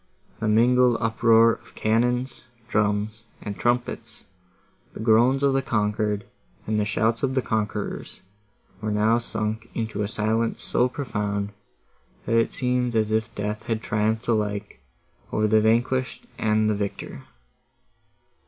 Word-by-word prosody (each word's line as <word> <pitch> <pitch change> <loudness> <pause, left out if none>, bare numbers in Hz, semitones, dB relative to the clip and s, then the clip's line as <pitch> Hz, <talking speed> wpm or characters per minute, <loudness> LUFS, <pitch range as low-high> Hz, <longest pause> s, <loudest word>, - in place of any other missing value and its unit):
The 115 - -1
mingled 120 +2 +4
uproar 115 0 +4
of 115 - -13
cannon, 125 +3 +1 0.4
drums, 105 +1 0
and 100 -1 -6
trumpets, 120 +2 -2 0.7
the - - -8
groans 120 +5 +4
of 140 -1 +4
the 135 - +2
conquered, 105 -3 -1 0.4
and 105 0 0
the 105 - +1
shouts 110 +2 0
of 130 -1 0
the 130 - +3
conquerors 105 -2 -3 0.6
were 110 - -2
now 110 +3 +3
sunk 110 0 -3
into 110 -2 -2
a 105 - 0
silence 110 +2 0
so 125 +1 +1
profound, 105 -6 -3 0.7
that - - -1
it 115 0 +3
seemed 125 -1 0
as 110 -1 +1
if 110 +1 +1
death 105 +1 -3
had 115 -1 -1
triumphed 110 +2 0
alike 105 - -1 0.5
over 110 - +1
the 110 0 +4
vanquished 125 - +1
and 110 0 +2
the 110 - +2
victor. 100 -9 -5
110 Hz, 135 wpm, -24 LUFS, 105-120 Hz, 0.7 s, mingled